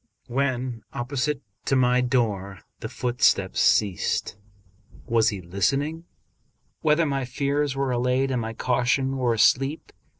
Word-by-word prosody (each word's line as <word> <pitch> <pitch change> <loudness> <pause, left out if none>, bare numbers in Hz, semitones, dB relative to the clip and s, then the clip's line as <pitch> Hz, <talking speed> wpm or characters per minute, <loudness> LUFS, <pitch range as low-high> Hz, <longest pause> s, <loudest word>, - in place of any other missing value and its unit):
When 125 -2 -2
opposite 135 +3 -2 0.2
to 135 - +1
my 125 -1 +3
door 105 -7 -1 0.2
the - - -6
footsteps 125 0 +1
ceased. 100 -1 +1 0.7
Was 115 -1 +3
he 100 -3 -5
listening 140 - -1 0.8
whether 155 +2 +3
my 140 -2 -1
fears 140 +2 -1
were 135 -1 -1
allayed 125 +2 +1
and 125 -2 0
my 110 0 -4
caution 130 +3 0
were 120 -3 +1
asleep 135 +7 +2
125 Hz, 125 wpm, -25 LUFS, 115-140 Hz, 0.8 s, my